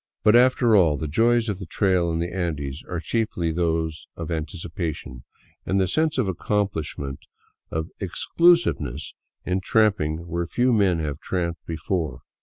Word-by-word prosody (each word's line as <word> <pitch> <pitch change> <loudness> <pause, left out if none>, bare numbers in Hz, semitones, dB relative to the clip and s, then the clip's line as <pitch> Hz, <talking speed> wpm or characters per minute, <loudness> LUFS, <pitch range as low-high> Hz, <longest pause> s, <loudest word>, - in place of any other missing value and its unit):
But, 105 +1 +6
after 120 -2 +5
all, 80 -7 +4
the 75 - -3
joys 115 +8 +3
of 100 -3 -2
the 95 - -7
trail 90 -3 +1
in 80 - -1
the 85 +1 -3
Andes 75 -6 -3
are 90 - -2
chiefly 85 -2 -1
those 80 -1 -1
of 85 0 -5
anticipation, 80 -5 -4 0.4
and 95 +1 0
the 95 - +2
sense 155 - +1
of 130 - +2
accompHsh 95 -3 -1
ment, 70 -1 -5 0.5
of 80 +1 -3
exclusiveness 140 - +2 0.3
in 90 +1 0
tramping 90 -7 +1
where 85 0 -2
few 125 +7 +2
men 100 -5 +3
have 75 -3 -3
tramped 85 -2 -3
be 80 - -3
fore. 80 -6 -2
85 Hz, 160 wpm, -24 LUFS, 80-105 Hz, 0.5 s, But